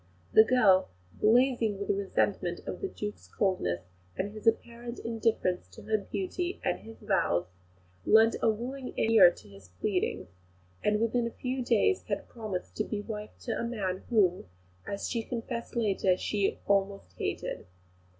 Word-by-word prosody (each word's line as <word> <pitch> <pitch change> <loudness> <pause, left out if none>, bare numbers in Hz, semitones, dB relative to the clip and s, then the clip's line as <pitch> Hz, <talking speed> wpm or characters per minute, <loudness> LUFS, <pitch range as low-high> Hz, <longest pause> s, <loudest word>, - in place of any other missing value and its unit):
The 220 - +9
girl, 210 - +4 0.2
blazing 230 -2 +3
with 200 - 0
resentment 200 -1 0
of - - -5
the 390 - -1
Duke's 210 - -6
coldness, 90 - 0 0.4
and 200 +2 -2
his 215 +1 -7
apparent 235 +1 0
indifference 225 - -1
to - - -11
her 215 -1 +1
beauty 360 - -3
and - - 0
his 225 0 -12
vows, 190 - +1 0.6
lent 225 - +6
a - - +4
willing 250 +4 -4
ear 225 -5 +7
to 175 - -12
his 100 -2 -15
pleadings, 180 - -2 0.5
and 210 0 +2
within 230 +1 +1
a 235 - -9
few 255 0 -2
days 240 - +3
had - - -3
promised 215 -6 -5
to 215 - +1
be 210 -1 -3
wife 210 -1 -7
to 240 - -4
a - - -1
man 200 -6 -2
whom, 190 - +3 0.4
as 200 0 -3
she 235 - -1
confessed 235 +1 -5
later, 195 -5 +2
she 200 0 0
"almost 195 - 0
hated." - - -3
215 Hz, 155 wpm, -30 LUFS, 195-235 Hz, 0.6 s, The